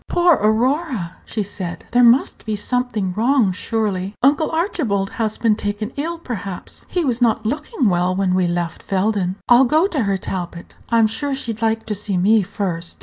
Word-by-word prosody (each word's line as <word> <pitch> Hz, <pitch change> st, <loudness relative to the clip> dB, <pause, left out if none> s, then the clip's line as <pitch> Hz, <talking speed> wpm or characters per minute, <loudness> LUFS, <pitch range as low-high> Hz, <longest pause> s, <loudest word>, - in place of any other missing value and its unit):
"Poor 350 Hz, 0 st, +4 dB
Aurora," 230 Hz, -, 0 dB
she 215 Hz, -, -2 dB
said; 185 Hz, -3 st, -6 dB
"there 245 Hz, +1 st, +4 dB
must 240 Hz, +3 st, +4 dB
be 215 Hz, -1 st, -2 dB
something 215 Hz, -3 st, -1 dB
wrong, 230 Hz, 0 st, +2 dB
surely. 200 Hz, -1 st, -2 dB
Uncle 290 Hz, +3 st, +3 dB
Archibald 285 Hz, -, -1 dB
has 215 Hz, -1 st, -1 dB
been 225 Hz, -2 st, +2 dB
taken 210 Hz, +2 st, -3 dB
ill, 330 Hz, +4 st, -3 dB
perhaps; 200 Hz, -, -6 dB
he 355 Hz, -3 st, -1 dB
was 250 Hz, -2 st, +1 dB
not 225 Hz, -2 st, +2 dB
looking 295 Hz, -, -1 dB
well 180 Hz, 0 st, +1 dB
when 190 Hz, -1 st, +1 dB
we 185 Hz, -1 st, +2 dB
left 175 Hz, -1 st, -2 dB
Felden. 195 Hz, -1 st, 0 dB
I'll 245 Hz, +2 st, +6 dB
go 310 Hz, +7 st, +3 dB
to 275 Hz, -, -1 dB
her, 195 Hz, -1 st, +1 dB
Talbot; 175 Hz, -2 st, -6 dB, 0.2 s
I'm 230 Hz, -1 st, +4 dB
sure 270 Hz, +6 st, -2 dB
she'd 230 Hz, -4 st, -5 dB
like 225 Hz, 0 st, 0 dB
to 220 Hz, -, -2 dB
see 200 Hz, -1 st, -2 dB
me 210 Hz, +4 st, +4 dB
first." 175 Hz, -3 st, -4 dB
220 Hz, 180 wpm, -20 LUFS, 190-250 Hz, 0.2 s, I'll